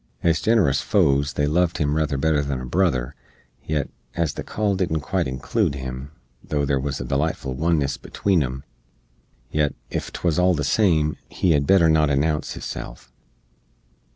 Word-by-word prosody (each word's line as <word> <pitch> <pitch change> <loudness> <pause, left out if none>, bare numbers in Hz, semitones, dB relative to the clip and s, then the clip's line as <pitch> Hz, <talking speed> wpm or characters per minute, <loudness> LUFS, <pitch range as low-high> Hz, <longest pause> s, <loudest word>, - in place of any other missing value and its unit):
Ez 85 -2 +2
ginerous 100 - +3
foes 70 +1 +2
they 75 - +1
loved 85 +3 +1
him 75 -1 0
ruther 75 -3 0
better 75 +1 +2
than 70 -2 -3
a 65 - -6
brother; 65 -4 0 0.5
yet, 75 -2 -1 0.3
as 85 -4 0
the - - -6
call 105 -2 -1
didn't 85 -4 -1
quite 65 - -1
inclood 65 +2 -1
him, 65 0 -6 0.3
tho' 75 -1 -1
there 70 -1 +1
wuz 70 +1 -2
a - - -4
delightful 70 -1 -1
oneness 75 -1 0
between 95 -5 0
em, 65 0 -3 0.9
yet, 75 -2 +1 0.2
ef - - -3
'twuz 85 -1 0
all 90 0 +4
the 75 - -1
same, 80 -1 +2
he 90 - +1
hed 70 -2 +2
better 95 -4 +5
not 80 -1 +4
announce 75 +2 0
hisself. - - -7
75 Hz, 165 wpm, -23 LUFS, 70-85 Hz, 0.9 s, better